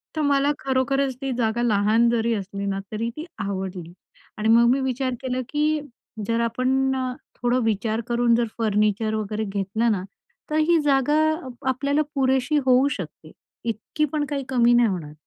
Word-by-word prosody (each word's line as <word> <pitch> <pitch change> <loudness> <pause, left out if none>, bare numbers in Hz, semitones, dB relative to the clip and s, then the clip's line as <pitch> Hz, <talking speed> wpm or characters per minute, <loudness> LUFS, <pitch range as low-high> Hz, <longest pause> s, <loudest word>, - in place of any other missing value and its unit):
तर 310 - 0
मला 285 0 +3
खरोखरच 265 0 0
ती 270 -1 -2
जागा 230 0 0
लहान 220 +1 +3
जरी 230 0 +1
असली 200 0 -5
ना, 195 0 -1
तरी 225 +2 -2
ती 315 - -5 0.2
आवडली 190 -3 -5 0.4
आणि 215 +1 0
मग 235 +1 +6
मी 270 - +2
विचार 260 0 -1
केला, 255 0 -2
की 300 0 +1 0.5
जर 230 0 +1
आपण 255 +3 +1 0.4
थोडं 245 +1 +1
विचार 220 +1 0
करून 235 -1 +3
जर 235 -1 +1
फर्निचर 215 0 +1
वगैरे 215 0 -2
घेतलं 205 +4 0
ना 185 -3 -1 0.5
तर 305 - 0
ही 325 +1 +4
जागा 285 +1 +2 0.5
आपल्याला 280 +3 +1
पुरेशी 265 +2 +2
होऊ 260 +2 +5
शकते. - - -7 0.3
इतकी 230 +7 -1
पण 295 -1 0
काही 280 -2 -2
कमी 240 -2 +4
नाही 240 -1 +5
होणार. 160 -6 -5
240 Hz, 160 wpm, -24 LUFS, 215-270 Hz, 0.5 s, मग